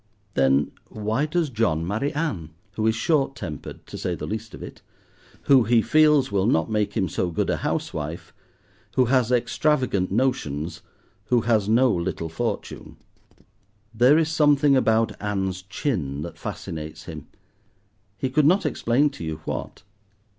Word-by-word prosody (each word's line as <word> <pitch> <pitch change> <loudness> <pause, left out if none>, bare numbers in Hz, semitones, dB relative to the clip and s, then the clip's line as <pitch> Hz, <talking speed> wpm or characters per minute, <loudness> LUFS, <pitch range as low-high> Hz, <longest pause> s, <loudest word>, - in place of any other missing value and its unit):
Then, 70 +1 +2 0.2
why 110 +7 -1
does 160 -2 0
John 105 -9 0
marry 110 +10 -1
Ann? 115 - -2 0.2
who 110 +3 -1
is 110 - +2
short 135 +1 +1
tempered, 75 -4 -7
to - - -8
say 90 - -2
the - - -6
least 110 +1 -5
of - - -9
it, - - -10 0.6
who, 130 -4 +5
he 115 0 +4
feels, 150 -5 +4
will 100 0 +1
not 85 -1 +1
make 105 -1 0
him 95 -3 +1
so 90 +2 -1
good 85 - -1
a - - 0
house - - -2
wife, 80 +2 -6 0.6
who 130 - +4
has 125 -1 +2
extravagant 125 - +1
notions, 90 - -1 0.4
who 120 -2 +2
has 110 -3 +1
no 125 +3 +4
little 85 -1 -3
fortune. 80 - -4 1.0
There 125 +6 +5
is 160 -1 +2
something 145 -2 +4
about 115 -3 +3
Ann's 95 -3 -2
chin 90 - -3
that 85 - -8
fascinates 80 -1 -6
him—he 100 +4 -10
could 150 +1 +4
not 185 +2 +3
explain 140 +1 +1
to 135 - -9
you 80 -1 -4
what. - - -5
110 Hz, 155 wpm, -24 LUFS, 90-135 Hz, 1.0 s, who